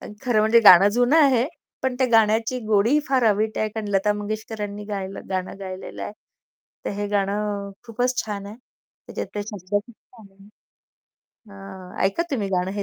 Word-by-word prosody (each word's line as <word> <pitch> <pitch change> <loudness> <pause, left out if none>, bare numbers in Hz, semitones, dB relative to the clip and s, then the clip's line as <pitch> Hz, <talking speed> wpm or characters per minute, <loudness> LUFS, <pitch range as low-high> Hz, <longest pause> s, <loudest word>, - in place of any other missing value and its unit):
पण - - -9
खरं 245 -5 +2
म्हणजे 220 +2 +5
गाणं 195 -2 +9
जुनं 245 +7 +2
आहे, 265 -6 +4 0.4
पण 260 -1 0
त्या 260 - +3
गाण्याची 225 +2 +3
गोडी 220 +7 +3
फार 260 -2 +2
अवीट 215 +1 +1
आहे, 215 - 0
कारण 215 -1 -5
लता 205 +1 +2
मंगेशकरांनी 210 0 -5
गायलं 195 -2 -6
गाणं 185 +1 -3
गायलेलं 185 -1 -7
आहे. - - -5 0.7
तर - - -2
हे 205 - -1
गाणं 200 0 -1 0.2
खूपच 245 +2 -1
छान 205 -2 -5
आहे. 210 +2 -9 0.5
त्याच्यातले 205 - -5
शब्द 205 -2 -8
खूप 205 +3 -1
छान 225 -1 -19
आहे. 195 +1 -19 1.0
हां, 190 -2 -10
ऐका 195 +12 +1
तुम्ही 215 -8 -1
गाणं 185 0 -1
हे 200 0 -3
210 Hz, 170 wpm, -23 LUFS, 195-225 Hz, 1.0 s, गाणं